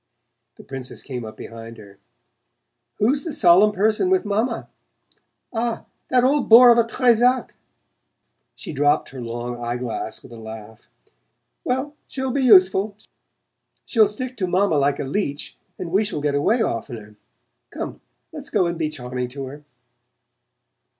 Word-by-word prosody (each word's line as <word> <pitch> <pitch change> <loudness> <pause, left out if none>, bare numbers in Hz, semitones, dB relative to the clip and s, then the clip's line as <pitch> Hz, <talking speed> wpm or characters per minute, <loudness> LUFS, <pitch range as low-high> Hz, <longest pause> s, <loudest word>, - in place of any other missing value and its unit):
The - - -14
Princess 135 -2 -7
came 125 -3 -6
up 110 -1 -9
behind 115 0 -10
her. 100 -2 -15 1.0
"Who's 275 +7 +1
the 330 - -4
solemn 205 - +5
person 215 - +1
with 375 -8 +2
Mamma? 215 +5 -1 0.9
Ah, 230 0 -2 0.2
that 250 -1 +3
old 275 +1 +2
bore 240 +2 +9
of 235 - +5
a - - +5
Trezac!" 245 +1 +2 1.0
She - - -8
dropped 145 +2 +2
her 130 -2 -9
long 120 +1 -5
eye 120 +1 -2
glass 115 -2 -5
with - - -14
a 115 - -10
laugh. 110 0 -11 0.8
"Well, 260 +4 -2
she'll 265 -1 -3
be 280 - 0
useful 195 -3 +5 0.9
she'll 220 -4 +4
stick 255 +5 -6
to 190 -4 -1
Mamma 180 -2 +2
like 140 0 +1
a - - -3
leech 145 0 -3 0.2
and 170 -2 -6
we 195 +4 +3
shall 205 -7 -3
get 145 0 -1
away 220 - +2
oftener. 110 - -5 0.5
Come, - - -7 0.3
let's - - -9
go 180 - +2
and 170 -1 -3
be 155 -2 0
charming 125 -4 -5
to 135 +2 -7
her." 145 +3 -10
175 Hz, 150 wpm, -22 LUFS, -, 1.0 s, bore